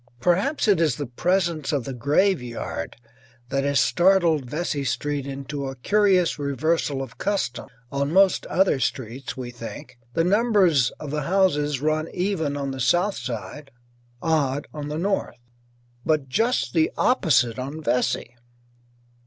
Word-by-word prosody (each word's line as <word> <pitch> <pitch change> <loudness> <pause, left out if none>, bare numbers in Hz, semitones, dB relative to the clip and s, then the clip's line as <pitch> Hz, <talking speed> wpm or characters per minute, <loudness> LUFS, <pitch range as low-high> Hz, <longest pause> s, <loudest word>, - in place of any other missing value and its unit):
Perhaps 195 - +1
it 195 -5 +4
is 160 -3 +2
the 145 - -4
presence 170 +3 0
of 140 -4 0
the 135 - -5
graveyard 125 - -1 0.5
that 135 0 0
has 140 0 +2
startled 170 -7 +3
Vesey 150 -2 -2
Street 140 +2 -2
into 140 +1 -5
a 135 - -5
curious 185 +4 +2
reversal 140 0 0
of 130 - -11
custom. 195 -12 -2 0.2
On 140 +1 -1
most 190 +2 +4
other 185 -7 +2
streets, 130 +1 -3
we 125 -2 -5
think, 120 +2 -9 0.2
the 165 - +3
numbers 190 - +3
of 145 - -6
the 150 0 -1
houses 150 -8 +2
run 155 +1 0
even 175 -6 -1
on 140 -1 -3
the 135 - -6
south 175 +10 +2
side, 135 +4 -6 0.5
odd 145 -4 +1
on 150 -1 -5
the 150 +1 -4
north. 190 -8 -1 0.7
But 155 -4 +1
just 225 - 0
the 160 -2 +2
opposite 130 - +2
on 140 +5 -5
Vesey. 125 -4 -1
150 Hz, 145 wpm, -24 LUFS, 135-175 Hz, 0.7 s, it